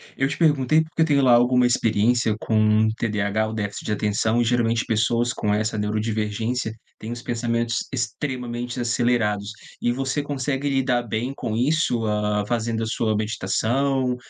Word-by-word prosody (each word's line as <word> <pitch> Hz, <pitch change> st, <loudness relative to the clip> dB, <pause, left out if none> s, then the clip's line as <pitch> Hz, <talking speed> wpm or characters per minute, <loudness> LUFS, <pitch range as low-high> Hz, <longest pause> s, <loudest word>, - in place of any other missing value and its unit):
Eu 135 Hz, -, +1 dB
te -, -, -4 dB
perguntei, 155 Hz, -2 st, +3 dB
porque 160 Hz, +1 st, -4 dB
eu -, -, +6 dB
tenho 145 Hz, -3 st, +3 dB
lá 130 Hz, -2 st, +5 dB
alguma 125 Hz, +1 st, +4 dB
experiência 115 Hz, 0 st, +2 dB
com 110 Hz, 0 st, +3 dB
TDAH 105 Hz, -1 st, 0 dB
ou 110 Hz, -, -5 dB
déficit 100 Hz, -2 st, -4 dB
de -, -, -2 dB
atenção, 105 Hz, +2 st, +1 dB
e -, -, +1 dB
geralmente 115 Hz, -1 st, +1 dB
pessoas 115 Hz, +2 st, +1 dB
com 105 Hz, -1 st, -1 dB
essa 110 Hz, +1 st, -1 dB
neurodivergência 110 Hz, +2 st, -1 dB, 0.3 s
têm 110 Hz, -, -7 dB
os 120 Hz, 0 st, -6 dB
pensamentos 115 Hz, -1 st, -1 dB
extremamente 125 Hz, -1 st, -4 dB
acelerados, 115 Hz, -4 st, 0 dB, 0.3 s
e 120 Hz, -, +1 dB
você 135 Hz, +3 st, -1 dB
consegue 145 Hz, 0 st, -2 dB
lidar 130 Hz, -3 st, +1 dB
bem 120 Hz, +3 st, -3 dB
com 110 Hz, -, -3 dB
isso, 125 Hz, -3 st, +1 dB
ah, 105 Hz, -1 st, 0 dB
fazendo 115 Hz, 0 st, -1 dB
a -, -, -1 dB
sua 110 Hz, -1 st, 0 dB
meditação, 120 Hz, +6 st, 0 dB
115 Hz, 160 wpm, -23 LUFS, 110-125 Hz, 0.3 s, eu